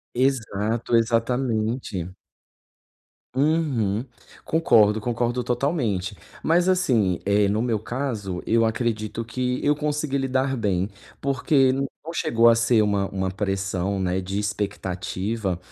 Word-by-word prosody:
Exato, 115 -3 0
exatamente. 115 -5 0 1.2
Uhum 130 -8 +1 0.4
concordo, 110 -10 +4
concordo 120 +2 -1
totalmente, 120 - -1 0.3
mas 175 +3 +3
assim, 120 - +2
eh, 100 0 +3
no 105 +3 +1
meu 115 -3 0
caso, 110 -6 -4
eu 115 0 +3
acredito 110 -1 -2
que 125 +2 -2
eu 145 +1 +4
consegui 150 -1 -1
lidar 135 0 0
bem, 100 -5 0 0.3
porque 135 0 +2
não 140 +4 -4
chegou 115 -6 +4
a - - +5
ser 115 -1 +3
uma 100 -2 +1
uma 95 -1 -2
pressão, 95 0 -2
né, 95 0 0
de 95 +2 -3
expectativa, 100 -1 -2
115 Hz, 115 wpm, -24 LUFS, 100-130 Hz, 1.2 s, a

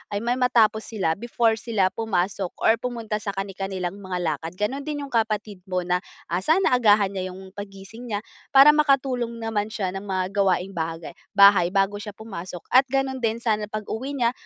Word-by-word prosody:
ay 205 - -2
may 245 +2 0
matapos 225 -3 +3
sila 195 -6 -1
before 230 -1 +1
sila 200 -5 +1
pumasok 195 -4 -2
or 225 +1 +4
pumunta 230 -4 -3
sa 200 -1 -5
kani-kanilang 195 -1 -4
mga 185 -2 -4
lakad. 160 +1 -3
Gano'n 265 +9 -3
din 290 -1 -3
'yong 280 - -9
kapatid 215 -3 -1
mo 180 -1 -1
na, 180 +1 +1 0.3
ah, 175 - +1
sana 320 - +2
agahan 205 -3 +4
niya 185 -1 -4
'yong 190 0 -11
paggising 200 +4 -10
niya, 205 +2 -2 0.3
para 280 +2 +10
makatulong 270 -5 +1
naman 225 -2 -2
siya 200 -4 -3
ng 195 +2 -6
mga 185 -1 -1
gawaing 195 -2 +1
bagay 165 -1 -4 0.2
bahay 200 -3 +7
bago 195 +1 +2
siya 210 -1 -8
pumasok. 185 -5 -8
At 265 +1 +6
gano'n 265 0 -1
din, 230 0 -1
sana 215 -2 0
pag-uwi 220 +6 -5
niya 240 -3 +2
210 Hz, 185 wpm, -24 LUFS, 190-235 Hz, 0.3 s, para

